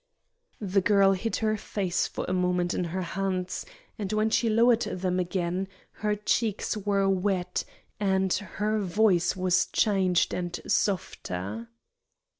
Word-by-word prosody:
The 195 -1 +1
girl 195 0 +4
hid 195 +4 -1
her 215 0 +2
face 190 -3 -1
for - - -5
a 185 - -1
moment 180 -1 +1
in 180 - -1
her 185 +2 -3
hands, 185 +1 -3 0.3
and 205 -2 -3
when 215 +1 +1
she 230 0 +2
lowered 230 +1 +4
them 185 -2 -1
again 180 +1 -1 0.2
her 210 0 -1
cheeks 210 +1 0
were 200 -1 +1
wet 190 -1 0 0.4
and 190 -2 +1
her 210 +2 -1
voice 195 -2 +2
was 185 -1 +2
changed 190 -4 +2
and 175 -1 -3
softer. 115 - -2
190 Hz, 135 wpm, -27 LUFS, 180-210 Hz, 0.4 s, girl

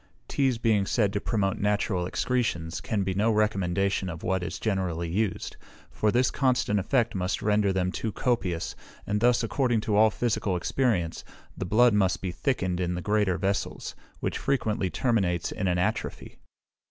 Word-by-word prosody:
Teas 135 -4 +1
being 110 -4 +2
said 105 -4 +1
to 100 - -1
promote 100 -4 0
natural 100 -3 0
excretions, 90 -10 -1
can 105 -3 -1
be 95 0 -1
no 105 +4 +2
recommendation 100 -3 +1
of 85 -2 -7
what 95 -1 0
is 90 - -4
generally 90 -5 -1
used; 95 +3 -2 0.3
for 105 - +1
this 125 +2 +2
constant 125 -6 +1
effect 115 +3 +1
must 90 -1 -2
render 105 -1 +2
them 90 -1 0
too 110 +3 -3
copious, 95 -9 -1 0.3
and 105 0 -1
thus, 120 0 +4
according 120 0 +1
to 105 -1 -1
all 110 +1 +6
physical 105 -4 -1
experience, 90 -5 0 0.3
the - - -4
blood 115 +5 +4
must 95 -3 +2
be 95 - -3
thickened 95 -5 -1
in 90 -1 -1
the 90 - -3
greater 105 -4 +1
vessels, 95 +3 -2 0.3
which - - -2
frequently 110 -8 0
terminates 95 -8 0
in 100 - -2
an 90 -1 +1
atrophy. 90 - -3
100 Hz, 165 wpm, -27 LUFS, 90-115 Hz, 0.3 s, all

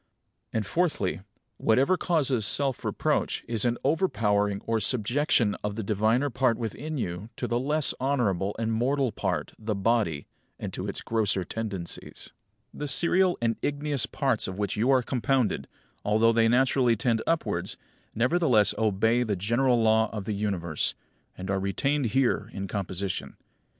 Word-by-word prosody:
And, 110 -2 -1
fourthly, 150 - -1 0.4
whatever 135 +11 +3
causes 140 -10 +1
self 130 +5 +1
reproach - - -1
is 115 -2 0
an 120 0 +1
overpowering 105 - +1
or 115 -1 0
subjection 120 0 +1
of 105 -1 -2
the 110 - -3
diviner 110 +7 +1
part 120 -1 +1
within 145 +7 -4
you 95 -2 -4
to - - -3
the 120 - 0
less 150 +3 +2
honourable 105 -8 0
and 115 0 -1
mortal 130 +2 +1
part, - - -3
the 110 -1 -2
body, 100 -7 0 0.3
and - - -6
to - - -4
its - - -4
grosser 105 -4 0
tendencies. 100 -4 -6 0.4
20. - - -13
The 145 - -2
serial 180 +5 +4
and 115 -1 +1
igneous 145 -2 0
parts 135 -6 -1
of 95 0 -6
which 105 -2 -2
you 115 +5 +1
are 130 -2 +4
compounded, 125 -2 0 0.4
although 110 +2 +3
they 115 0 +4
naturally 125 0 +3
tend 115 0 0
upwards, 165 -1 -1 0.4
nevertheless 125 - +3
obey 110 +3 +2
the 110 -4 0
general 120 +6 +2
law 110 -1 +3
of 105 -3 -5
the 110 - -2
Universe, 95 -6 -1 0.4
and 95 +1 -4
are 95 - 0
retained 135 +8 0
here 115 -2 +1
in 100 0 -4
composition. 95 -1 -4
115 Hz, 155 wpm, -27 LUFS, 105-135 Hz, 0.4 s, serial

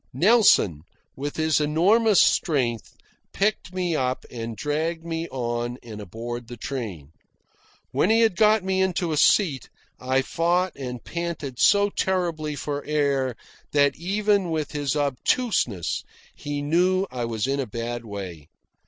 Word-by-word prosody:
Nelson, 175 - +4 0.3
with 145 +2 -5
his 160 -1 +2
enormous 195 +8 +4
strength, 125 -8 +1 0.4
picked 200 -3 0
me 180 -3 -1
up 130 -2 -1
and 115 -2 -6
dragged 160 +5 -2
me 165 0 -3
on 120 -1 -3
and 110 -3 -8
aboard 115 +4 -6
the 120 0 -9
train. 105 - -6 0.8
When 185 - +2
he 225 +1 +4
had 225 -5 +3
got 215 +1 +4
me 190 0 0
into 180 -2 0
a - - 0
seat, 145 - +3 0.3
I 130 +1 +1
fought 175 +4 0
and 125 -3 -6
panted 170 -7 -5
so 205 0 +4
terribly 170 -7 -1
for 145 0 -4
air 140 -4 0 0.4
that 145 -1 +4
even 200 +1 +1
with 155 -3 -2
his 145 -2 -1
obtuseness 140 - 0 0.3
he 145 0 -5
knew 180 +5 +2
I 125 -2 -3
was 110 -2 -2
in 135 +1 -1
a 135 - -2
bad 115 +2 -4
way. 95 -8 -7
145 Hz, 145 wpm, -24 LUFS, 120-180 Hz, 0.8 s, Nelson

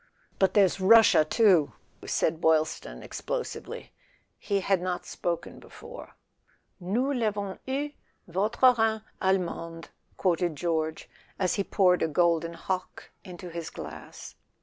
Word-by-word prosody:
"But 190 - +2
there's 195 -2 +4
Russia 220 -4 +7
too 180 -3 +3
" - - -18
said 160 +1 0
Boylston 155 - +1
ex¬ - - -8
plosively. - - -5 0.5
He 200 -1 -1
had 190 -1 +1
not 180 -1 -3
spoken 170 -1 -4
before. 480 +2 -12 0.3
" - - -40
4 180 -1 -9
Nous 260 +7 +1
Vavons 205 -4 -2
eu, 280 +3 -2 0.4
votre 215 +8 +3
Rhin 220 -1 +1 0.2
allemand 170 -3 -1
,' - - -47
" - - -37
quoted 175 -3 +1
George, 160 0 -2 0.3
as 185 -2 +1
he 200 - 0
poured 185 -3 +3
a - - +2
golden 170 +1 +1
Hock 185 +2 -5
into 180 -2 -9
his 165 -1 -5
glass. - - -9
185 Hz, 145 wpm, -27 LUFS, 165-205 Hz, 0.5 s, Russia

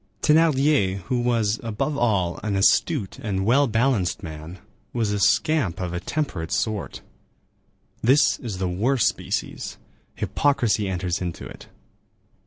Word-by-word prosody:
Thénardier, 145 -11 +3
who 125 +7 -2
was, 115 -3 +1
above 115 +6 -2
all, 100 -9 0
an 105 -2 -2
astute 105 - +2
and 100 -6 -2
well 135 +6 +4
balanced 110 -5 0
man, 80 +2 -8 0.4
was 115 -4 0
a 105 - -1
scamp 100 - +2
of 90 -2 -3
a 85 - -2
temperate 95 - -3
sort. 110 -3 -2 1.0
This 135 +6 +4
is 115 -8 -5
the 95 0 -1
worst 115 +8 +1
species; - - -3 0.4
hypocrisy 120 -8 +1
enters 90 -1 -2
into 85 -2 -5
it. - - -11
105 Hz, 130 wpm, -24 LUFS, 95-130 Hz, 1.0 s, well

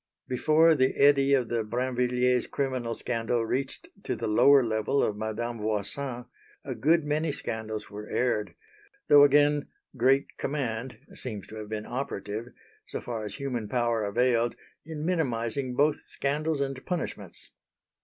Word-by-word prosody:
Before 155 +5 +4
the 130 -3 +2
eddy 140 -1 +5
of 125 -4 0
the 115 -1 0
Brinvilliers' 125 +1 +1
criminal 130 -4 -2
scandal 115 0 -1
reached 135 +4 -3 0.2
to - - -2
the - - -4
lower 135 +6 +6
level 110 +4 +1
of 105 - 0
Madame 110 +2 -4
Voisin, 120 +4 -2 0.4
a 135 - -3
good 155 +8 +3
many 150 +1 0
scandals 110 -5 -5
were 105 +1 -7
aired; 120 -4 0 0.5
though 145 -1 +9
again 145 +1 +4 0.3
"great 135 +3 +2
command" 130 -3 -3 0.2
seems 105 -7 -6
to 110 - -9
have 105 -1 -7
been 110 -1 -4
operative, 115 -4 -4 0.4
so - - -4
far 115 -3 -5
as 105 -1 -5
human 125 -6 -4
power 120 -2 +1
availed, 120 +2 +1 0.3
in 155 0 -6
minimising 130 -6 -1
both 145 +2 +3
scandals 150 +1 -2
and 135 -1 -3
punishments. 180 -2 -5
125 Hz, 145 wpm, -28 LUFS, 115-140 Hz, 0.5 s, though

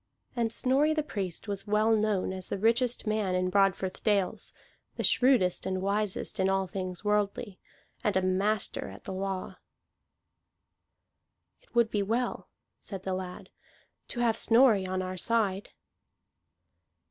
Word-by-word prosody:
And 230 -2 0
Snorri 280 +6 +2
the 305 - 0
Priest 200 - -5
was 200 0 -3
well 215 +2 +3
known 210 -3 0
as 185 -1 -6
the - - -2
richest 235 +4 +2
man 215 -4 0
in 185 0 0
Broadfirth 195 -1 +1
dales, 200 -4 0 0.4
the - - -3
shrewdest 245 -9 +3
and 190 0 -1
wisest 200 +1 -1
in 190 0 +3
all 195 0 +1
things 185 0 -5
worldly, 210 0 -1 0.4
and 210 -5 +2
a 190 - +1
master 195 +3 0
at - - -12
the - - -6
law. 190 0 -4 2.0
"It - - -30
would 235 -2 +3
be 205 - +1
well," 230 +5 -2 0.3
said 195 -2 -6
the 190 - -2
lad, 185 -1 -6 0.6
"to 240 - -3
have 230 -2 +2
Snorri 225 -5 +5
on 185 0 -2
our 185 0 -5
side." 205 -1 +1
200 Hz, 145 wpm, -29 LUFS, 190-225 Hz, 2.0 s, Snorri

